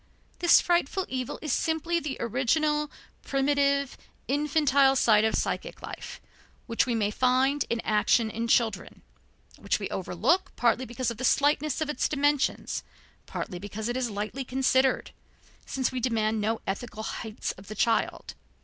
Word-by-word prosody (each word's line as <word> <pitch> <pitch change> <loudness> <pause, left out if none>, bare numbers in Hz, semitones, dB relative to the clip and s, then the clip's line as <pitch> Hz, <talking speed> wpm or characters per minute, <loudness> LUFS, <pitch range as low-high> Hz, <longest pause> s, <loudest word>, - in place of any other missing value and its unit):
This 345 - +6
frightful 350 +1 +1
evil 255 -2 -3
is 300 -5 -1
simply 330 +1 0
the 295 -4 -4
original, 295 +6 +1 0.3
primitive, 280 0 +1 0.3
infantile 280 -1 +3
side 215 -4 +4
of 220 - +2
psychic - - -3
life, - - -8 0.5
which 230 +1 +1
we 240 - 0
may 210 -2 0
find 260 +4 +2
in 235 - 0
action 220 +1 +2
in 230 +2 -3
children, 230 -1 0 0.6
which - - 0
we - - -4
overlook 375 +2 0
partly 245 +1 +2
because 240 +1 -2
of 230 - -8
the 255 - -6
slightness 295 +2 +2
of 310 - 0
its - - -1
dimensions, 290 -1 0 0.5
partly 180 -5 -5
because 205 +3 -5
it 240 - -2
is 255 -2 -1
lightly 210 +6 -4
considered, 260 0 +1 0.6
since 260 -1 -1
we 255 - -3
demand 220 -3 0
no 220 +2 -1
ethical 220 +2 -4
heights 220 0 -4
of 190 - -14
the 215 - -7
child. 225 +2 0
255 Hz, 150 wpm, -27 LUFS, 225-285 Hz, 0.6 s, This